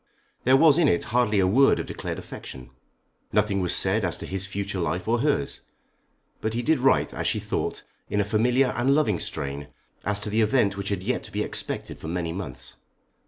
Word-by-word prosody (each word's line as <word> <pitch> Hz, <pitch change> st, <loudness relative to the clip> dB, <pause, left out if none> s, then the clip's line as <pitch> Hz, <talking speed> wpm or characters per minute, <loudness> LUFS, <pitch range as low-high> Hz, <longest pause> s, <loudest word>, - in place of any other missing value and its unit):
There 130 Hz, +2 st, +6 dB
was 155 Hz, +2 st, +6 dB
in 165 Hz, -, +5 dB
it 85 Hz, -, +2 dB
hardly 120 Hz, -4 st, +3 dB
a 95 Hz, -, +4 dB
word 130 Hz, +9 st, +5 dB
of -, -, -3 dB
declared -, -, -5 dB
affection. 60 Hz, -1 st, -9 dB, 0.6 s
Nothing 100 Hz, -1 st, +2 dB
was 90 Hz, -, 0 dB
said 95 Hz, +3 st, +1 dB
as 85 Hz, -3 st, -1 dB
to -, -, -6 dB
his 95 Hz, 0 st, -4 dB
future 100 Hz, -1 st, -3 dB
life 85 Hz, +2 st, -2 dB
or 120 Hz, +1 st, +2 dB
hers; 140 Hz, -, 0 dB, 0.8 s
but 110 Hz, +1 st, -2 dB
he 120 Hz, -, -1 dB
did 155 Hz, +2 st, +2 dB
write, 135 Hz, +1 st, +3 dB
as -, -, -2 dB
she -, -, +1 dB
thought, -, -, -3 dB, 0.3 s
in 105 Hz, -, 0 dB
a 100 Hz, -, +2 dB
familiar 120 Hz, +5 st, +2 dB
and 130 Hz, +3 st, +3 dB
loving 110 Hz, -, +2 dB
strain 70 Hz, +1 st, -4 dB, 0.4 s
as 105 Hz, 0 st, -1 dB
to 105 Hz, -, -3 dB
the 110 Hz, +2 st, +2 dB
event 110 Hz, -2 st, +2 dB
which 100 Hz, 0 st, -4 dB
had 100 Hz, -3 st, -2 dB
yet -, -, -1 dB
to -, -, -11 dB
be -, -, -1 dB
expected -, -, -5 dB
for -, -, -7 dB
many 85 Hz, 0 st, -2 dB
months. 95 Hz, -1 st, -8 dB
105 Hz, 210 wpm, -25 LUFS, 95-125 Hz, 0.8 s, There